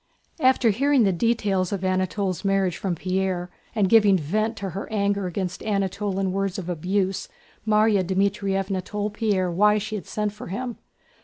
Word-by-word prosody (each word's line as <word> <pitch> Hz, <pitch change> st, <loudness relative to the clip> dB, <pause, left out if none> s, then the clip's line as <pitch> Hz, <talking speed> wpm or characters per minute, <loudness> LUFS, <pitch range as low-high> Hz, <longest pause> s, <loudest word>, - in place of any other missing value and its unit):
After 255 Hz, -5 st, +4 dB
hearing 275 Hz, +4 st, +3 dB
the 195 Hz, -, +3 dB
details 195 Hz, -2 st, +1 dB
of 195 Hz, -2 st, -3 dB
Anatole's 185 Hz, 0 st, -1 dB
marriage 195 Hz, -3 st, +1 dB
from 185 Hz, -3 st, -2 dB
Pierre, 185 Hz, 0 st, -2 dB, 0.2 s
and 205 Hz, -3 st, +3 dB
giving 205 Hz, -2 st, +5 dB
vent 215 Hz, +8 st, -1 dB
to 195 Hz, -3 st, -4 dB
her 195 Hz, +5 st, -6 dB
anger 200 Hz, -2 st, 0 dB
against 180 Hz, 0 st, -4 dB
Anatole 200 Hz, -1 st, -1 dB
in 195 Hz, -1 st, 0 dB
words 195 Hz, -1 st, -1 dB
of 180 Hz, -2 st, -5 dB
abuse, 185 Hz, +3 st, -1 dB, 0.4 s
Márya 210 Hz, -2 st, +4 dB
Dmítrievna 195 Hz, 0 st, 0 dB
told 205 Hz, +1 st, -3 dB
Pierre 200 Hz, -5 st, 0 dB
why 210 Hz, +4 st, +4 dB
she 215 Hz, +1 st, -4 dB
had 210 Hz, -, -5 dB
sent 210 Hz, -1 st, -2 dB
for 210 Hz, -, -9 dB
him. 240 Hz, +5 st, -5 dB
195 Hz, 165 wpm, -24 LUFS, 185-210 Hz, 0.4 s, giving